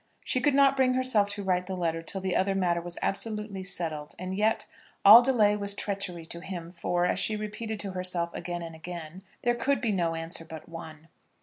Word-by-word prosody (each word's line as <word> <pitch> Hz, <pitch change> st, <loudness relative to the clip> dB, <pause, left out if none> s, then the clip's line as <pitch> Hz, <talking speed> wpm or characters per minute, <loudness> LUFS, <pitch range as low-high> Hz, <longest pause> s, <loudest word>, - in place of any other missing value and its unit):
She 255 Hz, -, +1 dB
could 285 Hz, +1 st, +3 dB
not 275 Hz, -1 st, +5 dB
bring 255 Hz, -1 st, +3 dB
herself 255 Hz, -6 st, +3 dB
to 200 Hz, 0 st, -3 dB
write 180 Hz, -1 st, 0 dB
the 190 Hz, -1 st, -4 dB
letter 165 Hz, -2 st, -1 dB
till 190 Hz, +4 st, -3 dB
the 190 Hz, -1 st, -1 dB
other 195 Hz, +1 st, +1 dB
matter 175 Hz, -3 st, +1 dB
was 175 Hz, 0 st, -8 dB
absolutely 210 Hz, -1 st, -3 dB
settled; 160 Hz, -5 st, -4 dB
and 185 Hz, +1 st, -4 dB
yet, 215 Hz, +2 st, +1 dB, 0.4 s
all 215 Hz, +4 st, +12 dB
delay 225 Hz, -5 st, +3 dB
was 200 Hz, -1 st, -2 dB
treachery 195 Hz, -5 st, -3 dB
to 170 Hz, -, -5 dB
him; 175 Hz, -2 st, -7 dB
for, 175 Hz, 0 st, 0 dB
as 180 Hz, -, 0 dB
she 215 Hz, +2 st, 0 dB
repeated 215 Hz, +1 st, -5 dB
to 195 Hz, -, -5 dB
herself 180 Hz, -2 st, 0 dB
again 175 Hz, 0 st, -4 dB
and 165 Hz, -1 st, -7 dB
again, 170 Hz, +1 st, -8 dB, 0.2 s
there 240 Hz, -, +3 dB
could 275 Hz, +3 st, +1 dB
be 230 Hz, -3 st, 0 dB
no 170 Hz, -4 st, 0 dB
answer 165 Hz, +1 st, -3 dB
but 160 Hz, -1 st, -10 dB
one. 160 Hz, -1 st, -10 dB
190 Hz, 210 wpm, -28 LUFS, 170-210 Hz, 0.4 s, all